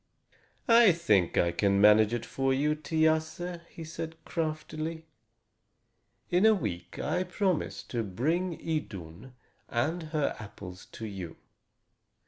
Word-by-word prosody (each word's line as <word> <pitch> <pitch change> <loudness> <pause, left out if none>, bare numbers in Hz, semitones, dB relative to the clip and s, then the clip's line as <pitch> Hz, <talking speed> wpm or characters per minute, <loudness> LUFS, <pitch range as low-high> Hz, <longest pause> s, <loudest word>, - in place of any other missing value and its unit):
"I 230 -5 +7
think 105 - +2
I 85 - +3
can 100 +2 +2
manage 105 +1 +6
it 120 -1 -2
for 135 0 0
you, 150 +3 +2
Thiasse," 160 +2 0
he 165 - -9
said 160 0 -6
craftily. 160 0 -3 1.3
"In 180 +2 +3
a 220 0 +7
week 90 - -5
I 180 - 0
promise 185 -1 -1
to 120 - -3
bring 155 - -1
Idun 110 - -5 0.4
and 155 +9 0
her 155 -2 0
apples 95 -3 -10
to 110 - -6
you. 95 -6 -7
155 Hz, 120 wpm, -29 LUFS, 105-165 Hz, 1.3 s, I